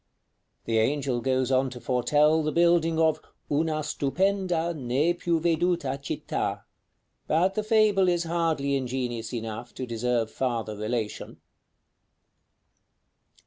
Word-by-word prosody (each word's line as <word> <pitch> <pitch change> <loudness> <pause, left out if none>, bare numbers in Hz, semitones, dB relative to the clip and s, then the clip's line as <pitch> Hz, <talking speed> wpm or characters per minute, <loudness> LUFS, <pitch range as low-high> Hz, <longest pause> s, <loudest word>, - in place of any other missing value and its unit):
'" - - -48
The 115 -1 +1
angel 130 +1 0
goes 130 0 0
on 130 0 +2
to 125 -1 -9
foretell 145 +6 +2
the 155 0 -1
building 170 -1 +3
of 160 -1 +2 0.3
"una 155 +1 0
stupenda, 175 +3 0
ne 140 +5 +1
più 170 -1 0
veduta 165 -4 0
Città;" 140 - -3 0.6
but 175 +5 +2
the 215 - -1
fable 210 -3 +3
is 175 -1 +1
hardly 165 -4 0
ingenious 125 -3 -3
enough 115 0 -6
to 130 - -4
deserve 115 -1 -1
farther 115 -4 -2
relation. 110 +1 -4
145 Hz, 120 wpm, -26 LUFS, 125-170 Hz, 0.6 s, building